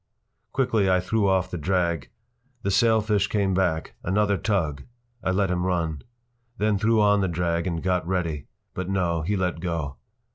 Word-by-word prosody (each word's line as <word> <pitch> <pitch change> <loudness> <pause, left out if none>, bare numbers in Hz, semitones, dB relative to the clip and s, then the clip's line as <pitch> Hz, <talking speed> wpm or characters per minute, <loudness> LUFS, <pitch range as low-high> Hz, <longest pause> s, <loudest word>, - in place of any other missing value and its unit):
Quickly 115 -7 +2
I 95 0 +4
threw 100 +3 +1
off 95 -1 +1
the 90 - -3
drag. 85 -4 0 0.5
The 100 - 0
sailfish 105 -1 +3
came 100 -3 +1
back. 90 -4 0
Another 100 +2 +2
tug! 80 -9 -1 0.4
I - - 0
let 95 0 +1
him 90 -1 0
run. 85 -5 -1 0.6
Then 105 -2 +1
threw 110 +2 +3
on 105 -1 +4
the 95 - +1
drag 85 0 -1
and 85 -2 -2
got 90 -2 0
ready. 85 -6 -2 0.3
But, 95 0 -4
no, 90 -4 0
he 100 +6 -1
let 90 -3 -1
go. 80 -5 -3
95 Hz, 170 wpm, -25 LUFS, 85-100 Hz, 0.6 s, I